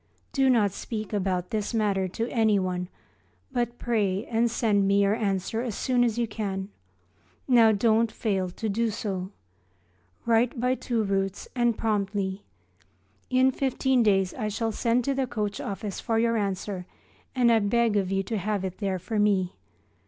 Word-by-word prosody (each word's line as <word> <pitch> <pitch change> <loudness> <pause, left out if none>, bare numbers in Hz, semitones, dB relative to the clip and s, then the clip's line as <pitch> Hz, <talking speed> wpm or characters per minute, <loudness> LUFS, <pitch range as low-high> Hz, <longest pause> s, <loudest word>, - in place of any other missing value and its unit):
Do 270 -1 +3
not 215 -6 +3
speak 215 +1 -5
about 185 -3 -1
this 215 +1 -2
matter 200 -4 +1
to 225 +6 -3
anyone, 190 -6 +1 0.6
but 240 0 -1
pray 210 -4 0
and 235 0 +1
send 210 -4 +2
me 200 +1 +4
your 200 +1 +3
answer 210 0 -1
as 235 -4 -3
soon 250 -2 +1
as 235 -2 0
you 235 -1 +1
can. 200 -3 -4 0.8
Now 235 -4 +6
don't 220 +1 +2
fail 195 -5 -1
to 220 +5 -5
do 225 +3 0
so. 195 -4 -3 1.0
Write 235 +2 +2
by 250 +1 +2
two 235 -3 -1
routes 195 -1 -1
and 240 -2 +2
promptly. 200 -2 -1 0.9
In 260 +1 +4
fifteen 265 -1 +1
days 195 -4 +2
I 215 - -3
shall 225 +2 -1
send 235 +3 +1
to 275 - 0
the 265 -1 -1
coach 210 -4 -3
office 200 0 -4
for 225 -1 -1
your 230 0 +2
answer, 195 -3 -2 0.5
and 245 -2 +4
I 225 - +5
beg 225 +1 +2
of 195 -2 0
you 195 0 +1
to 215 +2 -3
have 200 0 -1
it 185 -1 -6
there 195 -3 -1
for 210 +4 -3
me. 195 -3 +2
215 Hz, 165 wpm, -26 LUFS, 195-235 Hz, 1.0 s, Now